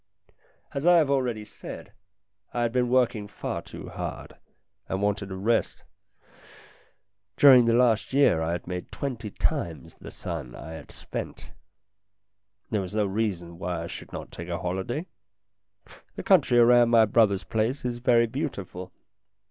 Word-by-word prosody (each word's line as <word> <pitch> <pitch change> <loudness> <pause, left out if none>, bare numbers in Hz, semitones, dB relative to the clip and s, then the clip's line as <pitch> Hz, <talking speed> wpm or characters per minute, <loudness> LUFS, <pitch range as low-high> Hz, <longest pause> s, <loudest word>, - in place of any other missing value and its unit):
As 140 +4 -1
I 175 0 +7
have 150 -4 +3
already 125 -6 0
said, - - -10 0.6
I 120 - +1
had 115 - 0
been 125 0 +1
working 120 -5 +2
far - - -5
too - - -10
hard, - - -6 0.5
and 95 - -1
wanted 100 0 -1
a 95 - -5
rest. 110 +5 0 1.5
During 130 -4 +8
the 115 0 +3
last 120 -3 +3
year 135 - +4
I 80 +1 -1
had 85 - -4
made 90 0 -6
twenty 120 -6 -4
times 80 -5 -3
the - - -11
sum 60 - -6
that - - -9
I 80 - -8
had 80 - -10
spent. - - -7 1.2
There 105 -3 +1
was 95 +2 -6
no 105 -1 +2
reason 95 -5 -3
why 90 -2 -3
I - - -5
should - - -9
not - - -7
take 85 0 -8
a 85 - -2
holiday. 95 - -3 1.1
The - - -6
country 120 - +4
around 120 0 +6
my 115 -2 +6
brother's 105 -2 +3
place 115 +5 -1
is 120 -1 -2
very 120 -1 +4
beautiful. 110 - -5
110 Hz, 155 wpm, -26 LUFS, 95-125 Hz, 1.5 s, During